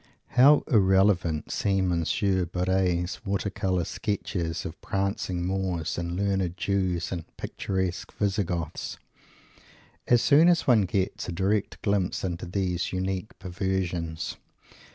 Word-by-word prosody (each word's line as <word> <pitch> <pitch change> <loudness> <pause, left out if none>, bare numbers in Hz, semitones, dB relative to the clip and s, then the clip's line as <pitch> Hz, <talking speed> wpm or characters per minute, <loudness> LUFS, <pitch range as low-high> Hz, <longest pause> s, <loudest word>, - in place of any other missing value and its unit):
How 140 +4 +6
irrelevant 95 -6 +3
seem 95 -2 +1
Monsieur 90 +2 +1
Barres' 90 +1 0
water 100 0 -1
colour 95 -3 0
sketches 85 -5 -3
of 80 - -7
prancing 100 -4 -2
Moors 95 -3 -1
and 85 0 -3
learned 95 -2 0
Jews 95 -4 0
and 85 -3 -3
picturesque 95 -2 -3
Visi 100 0 0
Goths, 85 -3 -4 1.1
as 120 -1 +4
soon 155 +4 +6
as 175 -1 +3
one 115 -6 +5
gets 95 -1 -2
a - - -2
direct 100 +4 0
glimpse 100 -3 0
into 90 -1 -3
these 90 -1 -1
unique 95 +2 -3
perversions! 90 -3 -3
95 Hz, 120 wpm, -27 LUFS, 90-100 Hz, 1.1 s, How